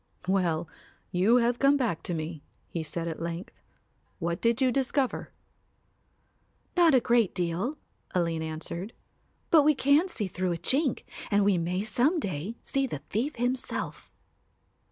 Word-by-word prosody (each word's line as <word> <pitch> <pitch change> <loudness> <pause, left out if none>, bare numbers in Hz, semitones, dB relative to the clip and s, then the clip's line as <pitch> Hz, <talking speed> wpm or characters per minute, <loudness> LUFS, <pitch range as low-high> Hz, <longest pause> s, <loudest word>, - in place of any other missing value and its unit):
"Well, 175 -4 +1 0.4
you 190 +7 +4
have 240 0 +2
come 275 +1 +5
back 230 - -1
to 175 - 0
me," 155 -1 -5 0.3
he 170 - -2
said 165 +2 -3
at 160 -1 -5
length. 170 +2 -5 0.6
"What 170 -1 -2
did 230 0 +2
you 260 -2 +3
discover?" 270 0 0 1.4
"Not 340 -5 +6
a - - +7
great 235 -4 +2
deal," 180 - -1 0.4
Aline 165 -2 +1
answered, 160 +6 -4 0.6
"but 320 - +8
we 300 +1 +4
can 285 +7 +4
see 235 - -2
through 185 -1 -1
a - - -3
chink 265 - 0 0.3
and 205 -1 +3
we 195 -3 +3
may 180 +3 -1
some 255 +10 +2
day 190 - -4
see 275 -1 0
the 145 - -6
thief 255 +9 -1
himself." 245 +2 -3
205 Hz, 150 wpm, -28 LUFS, 170-260 Hz, 1.4 s, but